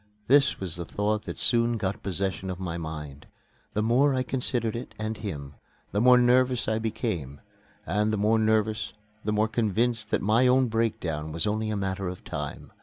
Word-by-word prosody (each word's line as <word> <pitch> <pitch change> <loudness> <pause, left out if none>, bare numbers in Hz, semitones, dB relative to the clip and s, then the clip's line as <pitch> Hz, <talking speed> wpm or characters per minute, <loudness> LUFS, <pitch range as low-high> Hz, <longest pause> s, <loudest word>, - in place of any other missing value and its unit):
This 140 +3 +4
was 90 -4 -4
the 85 - -3
thought 105 +4 -1
that - - -6
soon 120 -1 +2
got 100 -2 -2
possession 95 0 -2
of 90 -1 -4
my 90 -3 -3
mind. 75 -4 -7 0.5
The 105 - 0
more 130 +5 +3
I 130 - +1
considered 120 -3 -1
it 120 - -7
and 110 +1 -3
him, 75 -10 -6 0.4
the 105 - +1
more 125 +1 +7
nervous 125 0 +3
I 110 0 +1
became; 90 - -3 0.5
and 105 +5 +1
the 110 - 0
more 110 +2 +3
nervous, 110 0 +1 0.3
the 105 - -1
more 105 +1 +2
convinced 110 0 0
that - - 0
my 110 +5 +4
own 130 0 +4
breakdown 85 -9 -1
was 80 +1 -1
only 110 +1 0
a 105 - -1
matter 95 -1 -2
of 90 0 -6
time. - - -6
110 Hz, 185 wpm, -27 LUFS, 95-115 Hz, 0.5 s, more